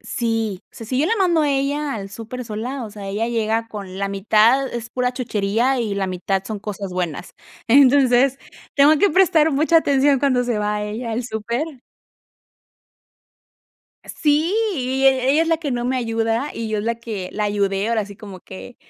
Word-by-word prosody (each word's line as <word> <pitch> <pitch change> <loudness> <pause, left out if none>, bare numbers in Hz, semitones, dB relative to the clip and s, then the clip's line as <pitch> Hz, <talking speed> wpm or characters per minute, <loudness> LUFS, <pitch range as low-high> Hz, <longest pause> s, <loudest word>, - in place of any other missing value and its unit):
Si, 225 -5 -2
o - - -
sea, 225 - -8
si 255 - -2
yo 305 - +2
la 455 - +1
mando 350 -4 +3
a 295 - +1
ella 280 +1 -1
al 200 -3 -6
súper 230 +4 -7
sola, 240 +4 -5
o 215 - -8
sea, 205 -1 -8
ella 210 +4 -1
llega 225 -1 -1
con 195 -4 -8
la 200 0 -1
mitad, 215 +7 +3
es 235 -1 -6
pura 250 0 -1
chuchería, 235 +1 0
y 215 -4 -2
la 195 -1 -1
mitad 190 +1 -2
son 210 0 -5
cosas 200 -2 -6
buenas. 180 -2 -4 0.3
Entonces, 265 0 +5 0.4
tengo 295 +2 +6
que 405 - +3
prestar 325 -3 +4
mucha 315 +4 +4
atención 280 -2 +2
cuando 255 -3 +2
se 240 -3 -1
va 210 0 -1
ella 225 +3 -5
al 240 +2 -2
súper. 235 +4 -3 2.4
Sí, 310 +4 +1 0.2
e 265 0 +2
ella 310 +3 +4
es 330 - -2
la 330 - +3
que 310 -3 -4
no 240 -1 -2
me 255 +1 0
ayuda, 225 +2 -1
y 230 -1 -4
yo 215 -1 -1
la 230 +2 -1
que 220 -5 -6
la 210 - -2
ayudé, 200 0 0
ahora 220 -3 0
sí 200 -1 -12
como 200 -4 -10
que 195 +7 -11
235 Hz, 185 wpm, -21 LUFS, 210-270 Hz, 2.4 s, tengo